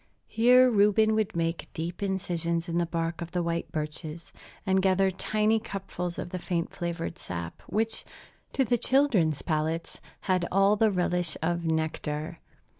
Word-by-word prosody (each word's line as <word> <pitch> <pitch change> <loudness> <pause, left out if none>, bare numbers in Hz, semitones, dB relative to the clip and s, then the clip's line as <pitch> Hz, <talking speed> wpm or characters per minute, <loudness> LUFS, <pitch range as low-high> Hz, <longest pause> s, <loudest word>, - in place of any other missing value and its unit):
Here 250 +3 +5
Reuben 215 -1 +4
would 215 -4 0
make 165 0 -2
deep 170 +4 -4
incisions 175 -3 -1
in 170 0 0
the 170 - 0
bark 165 0 -2
of 170 - -4
the 175 0 -1
white 170 0 -2
birches, 155 +1 -5 0.3
and 190 -1 +3
gather 190 0 +3
tiny 215 +3 +1
cupfuls 190 -5 -5
of 175 - -5
the 185 - -3
faint 170 -2 -2
flavored 170 0 -4
sap, 85 -1 -6
which, 220 +1 -1 0.5
to 265 - +2
the 240 0 +1
children's 220 - +2
palates, 160 +1 -2 0.2
had 185 -3 +1
all 195 +2 +4
the 220 +1 +3
relish 180 -3 +1
of 170 +1 0
nectar. 160 0 -2
175 Hz, 155 wpm, -28 LUFS, 165-200 Hz, 0.5 s, Here